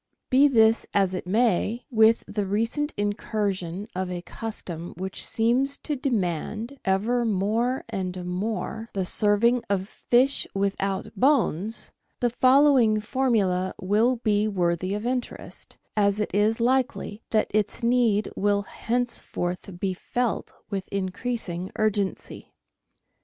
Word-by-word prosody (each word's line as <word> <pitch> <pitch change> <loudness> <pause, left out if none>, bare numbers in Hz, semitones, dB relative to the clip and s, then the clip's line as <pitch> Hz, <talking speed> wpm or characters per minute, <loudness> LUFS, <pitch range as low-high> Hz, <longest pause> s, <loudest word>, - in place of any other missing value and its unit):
Be 270 +3 +6
this 225 -4 +4
as 195 -2 +3
it 180 - -4
may, 225 +2 +1
with 220 0 +4
the 205 -1 -2
recent 230 +9 0
incursion 205 -2 -2
of 185 0 -3
a 175 -1 -5
custom 175 -7 -6
which 190 +1 0
seems 255 +5 +1
to 300 - -3
demand, 225 - -2
ever 220 +6 +1
more 225 +4 0
and 185 -4 -4
more, 220 +4 -3
the 190 -2 -1
serving 220 +5 +3
of 195 -1 0
fish 255 +5 +2
without 195 0 -2
bones, 225 - +1 0.3
the 240 -1 +1
following 255 -3 +5
formula 210 -6 0
will 215 +7 +2
be 215 -3 +1
worthy 185 -1 0
of 210 +2 -4
interest, 250 0 -5 0.2
as 205 -1 +2
it 210 - -2
is 210 +3 +2
likely 245 -3 0
that 215 -1 +1
its 215 +3 0
need 235 -3 +2
will 205 0 +1
henceforth 200 -6 -2
be 190 -1 -1
felt 240 +5 -2 0.2
with 195 -1 -3
increasing 190 -2 -3
urgency. 205 -3 -2
215 Hz, 125 wpm, -25 LUFS, 190-240 Hz, 0.3 s, Be